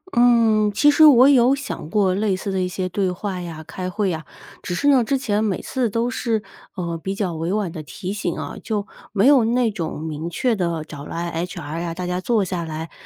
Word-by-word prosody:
嗯， 230 -3 +4
其 295 +8 +4
实 310 +2 +6
我 260 -2 +8
有 265 -1 +5
想 280 - -6
过 195 -1 +2
类 200 0 +1
似 195 +2 -4
的 190 -1 0
一 180 - 0
些 185 0 -3
对 190 +1 0
话 185 0 -4
呀， 165 -2 -7
开 185 +2 -5
会 200 -1 -1
呀， 160 -1 -4 0.4
只 180 - -4
是 285 - 0
呢， 265 -4 +5
之 270 +5 0
前 215 -5 0
每 205 -4 0
次 250 -3 -1
都 230 +3 0
是， 230 -3 -1 0.3
呃， 170 -3 -3
比 195 +3 -4
较 195 -4 -2
委 165 +2 -3
婉 205 -4 -1
地 160 - -6
提 190 +5 -6
醒 200 -5 -2
啊， 145 -2 -5
就 210 -2 -2 0.3
没 205 -1 +2
有 275 -3 +6
那 235 0 +2
种 165 -7 -4
明 160 +1 -4
确 230 +7 0
地 170 -5 -1
找 150 -2 -9
来 170 +1 -3 0.2
HR 165 -3 -6
啊， 170 -1 -3
大 180 +1 -4
家 180 +1 -2
坐 220 -1 +1
下 180 -2 -3
来， 160 0 -6
195 Hz, 250 characters per minute, -22 LUFS, 170-225 Hz, 0.4 s, 我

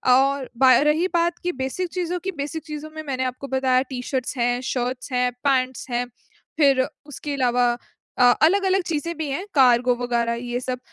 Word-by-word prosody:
और 275 0 +1
बा 260 0 +7
रही 320 +4 +2
बात 345 0 +1
कि 355 - 0
बेसिक 340 +8 -2
चीज़ों 360 -1 -2
की, 385 - -2
बेसिक 310 0 -5
चीज़ों 305 0 -7
में 315 - -5
मैंने 265 -3 -2
आपको 255 +2 -5
बताया 260 -1 +2
टी-शर्ट्स 255 +1 -3
हैं, 245 0 +1
शर्ट्स 250 +1 -3
हैं, 250 0 +1
पैंट्स 260 -2 0
हैं, 245 0 -1 0.5
फिर 275 -4 +4 0.2
उसके 290 0 -6
अलावा 245 -2 +2 0.5
अ, - - +4 0.2
अलग-अलग 385 +3 +3
चीज़ें 335 +2 -2
भी 315 -2 -3
हैं, 300 +8 -3
कार्गो 250 -2 +5
वगैरह 235 -1 0 0.2
ये 240 +1 -1
सब, 255 0 -4
265 Hz, 175 wpm, -23 LUFS, 250-310 Hz, 0.5 s, बा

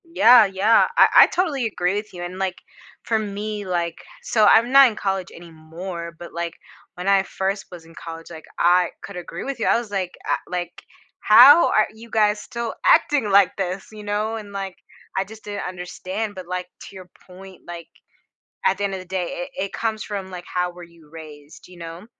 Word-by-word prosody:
Yeah, 250 -9 +6
yeah, 195 +3 +3
I - - +8 0.2
I - - +4
totally 310 -9 -1
agree 185 -3 -1
with 210 0 -5
you, 175 -1 -7
and, 180 +1 -7
like, 190 -1 -1 0.5
for 225 - 0
me, 210 0 -5
like 170 -2 -2 0.3
so, 220 - +2
I'm 230 +4 +5
not 275 0 +8
in 225 - -3
college 190 -2 -2
anymore, 170 +1 -9
but, 175 - -11
like, 170 0 -4 0.4
when 180 +2 -6
I 195 -1 +4
first 195 +1 -3
was 175 -2 -11
in 165 - -17
college, 165 0 -9
like, 160 -1 -10
I 175 0 +4
could 200 - -9
agree 180 -1 -7
with 275 -2 -5
you. - - -1
I - - +4
was 235 -2 -5
like, 190 -3 -2
"I" - - +1
like, 180 -1 -5 0.4
"How 265 +10 +8
are 215 - +3
you 230 +1 -14
guys 210 -1 +1
still 235 -1 -5
acting 290 - +3
like 200 -1 +4
this?" 190 0 -4
you 215 -1 -10
know, 210 +2 -2
and, 210 -2 -8
like, 195 -2 -5 0.4
I 190 - +1
just 220 +2 -14
didn't 205 -2 -5
understand, 185 +4 -5
but, 185 -2 -9
like, 180 0 -4
to - - -12
your 185 -1 -11 0.2
point, 190 +1 -13
like, 170 -1 -8 0.8
at - - +2
the 205 - -2
end 195 -1 -2
of 190 - -5
the 185 - -12
day, 185 -1 -3 0.3
it - - -2
it - - -14
comes 220 -1 -2
from, 195 -2 -6
like, 180 -1 -8
how 180 0 0
were 175 0 -12
you 170 -3 -17
raised, 150 -2 -13
you 180 -1 -15
know? 170 +3 -9
190 Hz, 210 wpm, -22 LUFS, 175-215 Hz, 0.8 s, I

